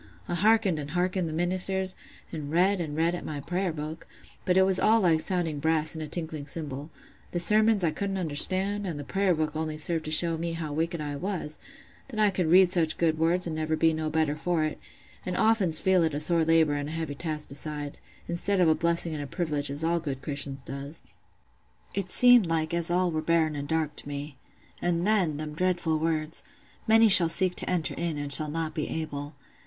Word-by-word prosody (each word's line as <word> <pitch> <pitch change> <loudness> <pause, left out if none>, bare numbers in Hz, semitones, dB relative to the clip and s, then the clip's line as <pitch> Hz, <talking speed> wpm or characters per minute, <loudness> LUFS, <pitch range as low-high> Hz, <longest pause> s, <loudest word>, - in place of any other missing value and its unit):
I - - -3
hearkened 205 -2 +2
and 145 -1 -6
hearkened 180 +1 -1
the - - -6
ministers, 185 +2 0 0.4
and 150 -3 -6
read 180 +4 +2
an' 150 -3 -5
read 165 +2 +1
at 175 - -5
my 150 -2 -5
prayer 180 +5 -2
book; 155 +1 -7 0.4
but 185 -1 +2
it 190 - +6
was 190 -1 +2
all 225 +1 +4
like 165 -4 +3
sounding 165 -4 -2
brass 160 0 0
and 160 - -7
a 155 - -5
tinkling 155 -2 -5
cymbal: 145 -1 -4 0.4
the 175 - -3
sermons 215 +2 +3
I 165 - +2
couldn't 195 +3 -3
understand, 190 +5 +1
an' 165 -4 -4
th' 145 -1 -8
prayer 195 -2 +1
book 155 -1 -2
only 155 -1 -3
served 160 +1 -1
to - - -4
show 165 +1 +3
me 170 0 -3
how 160 -3 -5
wicked 165 +2 -2
I 145 -1 -4
was, 175 -3 -4 0.5
that 235 -5 -7
I 210 -1 +4
could 180 -4 -1
read 180 +1 +6
such 165 -4 +2
good 160 -2 0
words 170 +3 +1
an' 165 - -4
never 155 0 -1
be 160 0 +2
no 155 0 -3
better 155 -1 0
for 160 +1 -1
it, 155 - -3 0.4
and 180 - -4
oftens 195 -7 +2
feel 190 -1 +3
it 160 -3 0
a - - -1
sore 165 +2 +3
labour 160 -2 +3
an' 145 0 -3
a - - -6
heavy 160 -3 -4
task 150 0 -3
beside, 145 0 -3 0.3
instead 185 +3 -1
of 180 - +4
a 160 - +5
blessing 170 0 0
and 150 - -4
a - - -7
privilege 150 -4 -2
as 145 +3 -2
all 170 +1 +1
good 135 -5 -6
Christians 140 -2 -2
does. 140 +4 -7 0.9
It 195 -2 -3
seemed 245 -4 +6
like 160 0 -1
as 170 -1 +1
all 180 0 +1
were 155 -1 -2
barren 160 -1 +1
an' 145 0 -5
dark 160 -1 -1
to - - -3
me. 145 -1 -7 0.4
And 175 0 0
then, 190 -8 +1
them 150 0 -6
dreadful 175 -2 0
words, 160 0 -2 0.5
'Many 225 +1 +6
shall 180 -5 +9
seek 185 +2 +1
to - - +2
enter 175 -4 0
in, 170 -3 -3
and 145 -1 -1
shall 155 0 +2
not 160 0 -3
be 155 -2 -3
able. 145 -2 -5
165 Hz, 220 wpm, -27 LUFS, 155-180 Hz, 0.9 s, shall